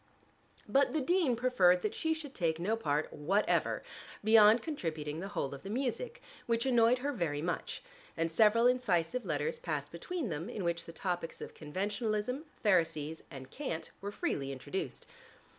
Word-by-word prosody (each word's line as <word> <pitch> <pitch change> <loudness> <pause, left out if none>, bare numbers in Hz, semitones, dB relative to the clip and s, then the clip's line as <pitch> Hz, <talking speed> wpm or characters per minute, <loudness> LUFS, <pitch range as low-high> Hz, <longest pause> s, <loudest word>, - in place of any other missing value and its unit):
But 275 +1 +3
the 310 - +2
dean 315 -3 +2
preferred 190 -8 +4
that 215 - 0
she 320 -1 0
should 295 -4 -8
take 165 -4 0
no 205 +6 +1
part 150 -8 -1
whatever, 190 +8 +1 0.4
beyond 220 +1 +7
contributing 160 - -3
the 190 - -4
whole 165 -9 -3
of 140 - -8
the 195 - -8
music, 275 - -2 0.2
which 230 +1 +1
annoyed 240 -1 +5
her 290 - +1
very 155 - -1
much, 175 - -3 0.3
and 165 0 0
several 220 +6 +5
incisive 245 -2 +2
letters 475 0 -1
passed - - -3
between 350 - -4
them 165 +5 -4
in 210 -5 -4
which 170 -1 -1
the - - -8
topics 175 -1 -3
of - - -7
conventionalism, 210 - -2 0.2
Pharisees 160 -6 +2
and 130 -3 -10
cant 215 - -4
were 200 +1 -4
freely 140 -8 -2
introduced. 145 +7 -4
205 Hz, 160 wpm, -33 LUFS, 165-250 Hz, 0.4 s, beyond